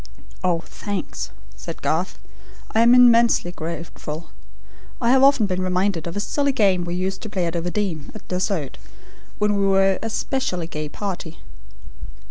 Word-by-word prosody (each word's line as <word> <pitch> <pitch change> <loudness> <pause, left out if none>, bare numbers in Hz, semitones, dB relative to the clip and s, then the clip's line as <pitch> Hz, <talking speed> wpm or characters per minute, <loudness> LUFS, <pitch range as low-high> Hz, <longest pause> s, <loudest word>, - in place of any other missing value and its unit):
"Oh, 175 -2 +1
thanks," 195 - -5 0.3
said - - -8
Garth. 170 +4 0 0.5
"I 220 - +2
am 240 +2 +7
immensely 235 -6 +5
grateful. 165 -1 -6 0.7
I 235 -1 +2
have 265 0 +5
often 275 -5 +5
been 185 -2 -1
reminded 185 -2 0
of 170 - -5
a - - +1
silly 280 +7 0
game 195 -8 +2
we 175 0 -3
used 190 +1 -2
to 220 - -6
play 185 -3 -1
at 165 - -2
Overdene, 175 -2 -2
at 215 - -11
dessert, 180 -6 -2 0.6
when 210 0 +2
we 200 0 +2
were 195 0 +3
a 225 - -3
specially 220 -7 -2
gay 155 -2 -5
party. 180 -3 -5
190 Hz, 155 wpm, -22 LUFS, 170-210 Hz, 0.7 s, am